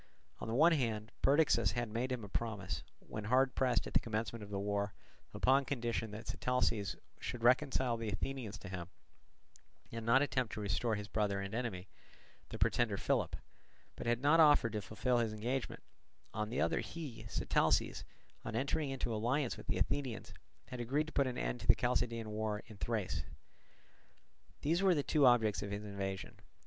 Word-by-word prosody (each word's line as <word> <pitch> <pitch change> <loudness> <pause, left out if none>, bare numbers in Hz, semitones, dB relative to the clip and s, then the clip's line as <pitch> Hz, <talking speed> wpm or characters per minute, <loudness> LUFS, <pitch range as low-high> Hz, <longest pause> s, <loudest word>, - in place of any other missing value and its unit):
On - - -5
the 115 - -1
one 160 +6 +6
hand 115 -7 0
Perdiccas 135 -9 +4
had 120 +1 -1
made 120 +4 -2
him 125 -3 -2
a - - -6
promise, 100 -4 -3 0.2
when 105 -1 -7
hard 130 +3 +3
pressed 130 -2 +2
at - - -7
the - - +5
commencement 115 0 -3
of 105 - -8
the 100 - -3
war, 100 0 -1 0.4
upon 135 +2 +3
condition 120 -4 -2
that 105 +2 -8
Sitalces 125 -5 0 0.2
should 120 - -5
reconcile 130 -1 +3
the 115 -1 -3
Athenians 115 0 -3
to - - -10
him 90 -2 -5 1.0
and 115 0 -5
not 125 +5 +5
attempt 125 -5 -1
to - - -4
restore 110 +2 0
his 105 0 -5
brother 105 -2 0
and 100 +1 -5
enemy, 110 -6 -3 0.6
the - - -6
pretender - - +2
Philip, - - 0 0.6
but - - -6
had 120 0 +2
not 155 +3 +5
offered 145 -7 +6
to 105 - -1
fulfil 120 +5 0
his 115 -2 0
engagement; 120 +4 -3 0.5
on 105 0 -2
the 125 - -2
other - - +2
he, 125 -10 -6
Sitalces, - - +1 0.4
on - - -4
entering 140 +4 0
into 130 -3 -2
alliance 120 +5 0
with - - -11
the - - 0
Athenians, 125 +5 -2 0.4
had 125 -1 -6
agreed 135 +6 0
to 155 - -10
put 140 -2 +3
an 125 - -3
end - - -2
to - - -8
the - - +8
Chalcidian 115 -2 0
war 105 0 -2
in 110 -3 -12
Thrace. 110 -3 -2 1.4
These 165 +5 +2
were 190 -2 +5
the 145 - +1
two 145 -3 +4
objects 110 -7 +4
of 100 - -4
his 100 +1 -4
invasion. 95 -2 -4
115 Hz, 180 wpm, -35 LUFS, 105-130 Hz, 1.4 s, the